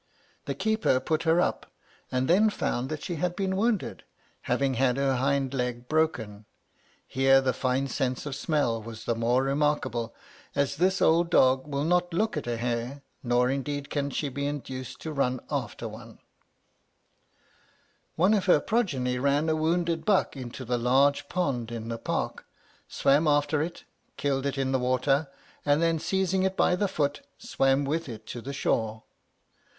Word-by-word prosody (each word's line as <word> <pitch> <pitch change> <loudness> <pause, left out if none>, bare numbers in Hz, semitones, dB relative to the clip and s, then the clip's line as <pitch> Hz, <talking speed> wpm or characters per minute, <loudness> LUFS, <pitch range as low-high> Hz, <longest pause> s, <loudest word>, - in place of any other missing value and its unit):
The - - -3
keeper 220 -11 +1
put 155 +4 -1
her 165 +2 +4
up, - - 0 0.4
and 130 +1 0
then 205 +5 +5
found 130 -10 -2
that 155 -1 -5
she 175 - -4
had 175 +3 -1
been 190 0 -1
wounded, 215 0 -1 0.5
having 135 -1 +1
had 125 0 +2
her 135 -2 +1
hind 135 +1 0
leg 125 -2 -3
broken. 115 -10 -1 0.6
Here 135 0 +4
the 130 -1 0
fine 130 +2 0
sense 130 0 -2
of 140 -2 -4
smelling 135 -7 0
was 110 0 -9
the 115 - +1
more 120 +3 +1
remarkable, 135 -5 0 0.4
as 140 0 0
this 185 +3 +2
old 170 +1 +4
dog 130 -4 +4
will 140 -1 -2
not 175 +1 +1
look 220 +2 +1
at 150 - -4
a 120 -1 -1
hare, 120 +4 -3 0.2
nor 125 +1 +2
indeed 140 +1 -3
can 140 -1 -1
she 145 - -2
be 140 +1 -3
induced 130 -3 -6
to 160 - -5
run 130 -3 0
after 120 -5 -3
one. 110 +1 -11 2.0
One 185 +6 +4
of 200 -4 +1
her 175 - +6
progeny 140 - 0
ran 140 +4 +2
a 160 - +2
wounded 165 +1 0
buck 195 -6 +2
into 130 0 -7
the 120 +1 0
large 135 +4 +3
pond 130 -10 -1
in 115 -1 -5
the 115 0 -4
Park, - - -3 0.4
swam 145 +4 +2
after 145 0 +2
it, 170 +2 -4 0.3
killed 140 -1 0
it 140 - -3
in 135 -1 0
the 130 - +2
water, 130 +3 +1 0.4
and 145 +1 +3
then 165 -1 +2
seizing 190 +2 0
it 190 0 0
by 180 - +3
the 200 +3 0
foot, 145 -4 -1 0.2
swam 135 - +1
with 155 +1 -2
it 110 -2 -8
to 120 +2 -7
the 135 - -6
shore. 110 -5 -1
140 Hz, 170 wpm, -27 LUFS, 125-160 Hz, 2.0 s, her